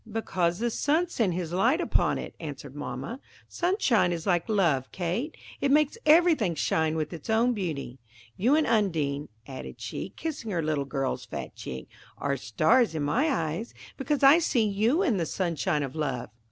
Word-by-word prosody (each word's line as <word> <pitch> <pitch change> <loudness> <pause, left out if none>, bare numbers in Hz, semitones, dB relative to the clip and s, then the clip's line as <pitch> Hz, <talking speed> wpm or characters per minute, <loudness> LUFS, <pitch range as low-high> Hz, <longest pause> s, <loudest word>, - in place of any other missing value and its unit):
"Because 180 -6 0
the 235 +2 -1
sun 315 +8 +1
sent 210 - 0
his 175 -2 -3
light 235 - +3
upon 350 - +1
it," - - -6
answered 145 -3 -7
mamma. 145 - -5 0.3
"Sunshine 270 - +2
is 165 -2 -3
like 175 +1 +1
love, 165 -11 +1
Kate,–it 230 - -3
makes 300 +3 +3
everything 305 - +5
shine 160 0 +1
with 155 +1 -2
its 165 +3 -9
own 230 +3 +3
beauty. 150 - -4 0.4
You 245 +9 +3
and 310 -1 +3
Undine," 155 -10 0 0.2
added 130 -2 -8
she, - - -5
kissing 295 -8 -5
her 170 -5 -1
little 150 -2 0
girl's 135 -1 -2
fat - - -6
cheek, 65 0 -7 0.3
"are 140 -1 -1
stars 155 - +2
in 155 - -1
my 255 - +1
eyes, 170 - -2 0.2
because 280 +2 -1
I 280 +5 +8
see 240 -9 +2
you 225 - +2
in 245 - +2
the 170 - 0
sunshine 170 -3 -1
of 135 0 -6
love." 135 -7 -3
185 Hz, 170 wpm, -27 LUFS, 150-250 Hz, 0.4 s, I